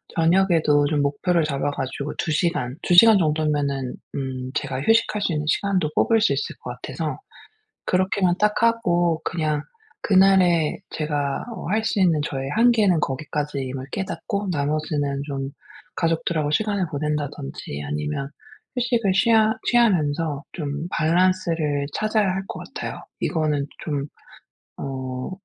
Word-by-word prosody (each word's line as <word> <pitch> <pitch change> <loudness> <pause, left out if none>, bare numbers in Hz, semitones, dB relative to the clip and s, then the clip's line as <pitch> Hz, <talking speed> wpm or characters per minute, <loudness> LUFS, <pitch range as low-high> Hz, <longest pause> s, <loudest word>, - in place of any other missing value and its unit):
저녁에도 165 -4 +3
좀 150 -1 +1
목표를 160 +5 +1
잡아 145 -1 -1
가지고 140 +1 -4
2 160 - -1
시간, 150 -6 0
2 - - +1
시간 220 +4 +8
정도면은 150 -5 0 0.2
음 130 -1 -4
제가 130 - -2
휴식할 225 +3 +2
수 195 - 0
있는 150 -1 -2
시간도 185 -3 +1
뽑을 225 -1 +3
수 145 - +3
있을 140 - -3
것 125 - -6
같아서 150 +4 -4 0.7
그렇게만 185 -1 +2
딱 210 +2 +2
하고 175 -8 +2
그냥 155 -3 -1 0.4
그날에 185 -5 +4
제가 145 -3 -2
어 - - -7
할 215 +3 +1
수 220 - 0
있는 170 -4 +4
저의 135 -1 -4
한계는 220 -5 +4
거기까지임을 135 -2 -3
깨닫고 200 +1 -3
나머지는 145 -2 -1
좀 135 -2 -4 0.4
가족들하고 165 -2 0
시간을 200 +2 +1
보낸다든지 145 - -4
아니면 75 - -3 0.5
휴식을 235 -5 +1
취하 220 +2 +4
취하면서 160 -10 +2
좀 145 -1 -4
밸런스를 175 +2 +2 0.4
찾아야 215 -1 +1
할 190 +1 -2
것 - - -6 0.2
같아요. - - -5 0.2
이거는 155 -4 0 0.2
좀 145 -3 -2 0.7
어 130 -2 -4
155 Hz, 290 characters per minute, -23 LUFS, 140-190 Hz, 0.7 s, 시간